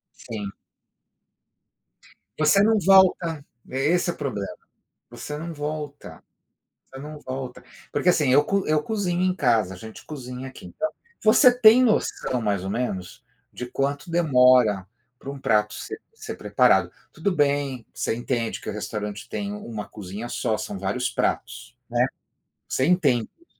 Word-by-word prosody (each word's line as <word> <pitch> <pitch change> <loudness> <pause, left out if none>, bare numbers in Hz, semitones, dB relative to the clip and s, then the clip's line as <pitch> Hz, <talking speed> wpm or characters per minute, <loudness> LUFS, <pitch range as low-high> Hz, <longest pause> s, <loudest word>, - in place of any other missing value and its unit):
Sim. 105 -3 -6 1.9
Você 155 +6 +5
não 220 +1 +4
volta. 180 -5 +4 0.2
É, 130 - -4
esse 175 +2 +2
o - - -9
problema. 110 -9 -3 0.6
Você 150 - -6
não 165 +2 -6
volta, 150 -1 -6 0.6
você 135 - -12
não 150 +2 -8
volta, 130 -1 -6 0.3
porque, - - +1
assim, 150 -7 +4
eu 145 +3 +6
co 195 +4 0
eu 155 0 +2
cozinho 185 -4 -1
em 185 0 +2
casa. 115 - +2
A - - -10
gente 110 +4 -11
cozinha 130 -3 -7
aqui, 130 - -12
então 315 0 -3 0.3
você 245 +4 +7
tem 235 0 +8
noção, 215 - +1
mais 100 -3 0
ou 95 - -3
menos, 120 0 -4 0.3
de - - -6
quanto 140 +5 -2
demora 125 - +4 0.3
pra 140 - -7
um 140 - -7
prato 105 -4 +1
ser 425 0 -7
ser 435 0 -7
preparado. - - +3 0.2
Tudo 200 - -1
bem, 140 -6 0
você - - -1
entende 120 -1 -2
que - - -9
o - - -2
restaurante 105 0 -5
tem 205 0 -4
1 115 - -6
cozinha 105 +3 -7
só, 115 -2 -1
são - - -5
vários 105 +7 -1
pratos, - - -2
né. - - +2 0.7
Você 130 - +1
entende 145 -10 +3
isso. 340 - -25
135 Hz, 155 wpm, -24 LUFS, 115-175 Hz, 1.9 s, tem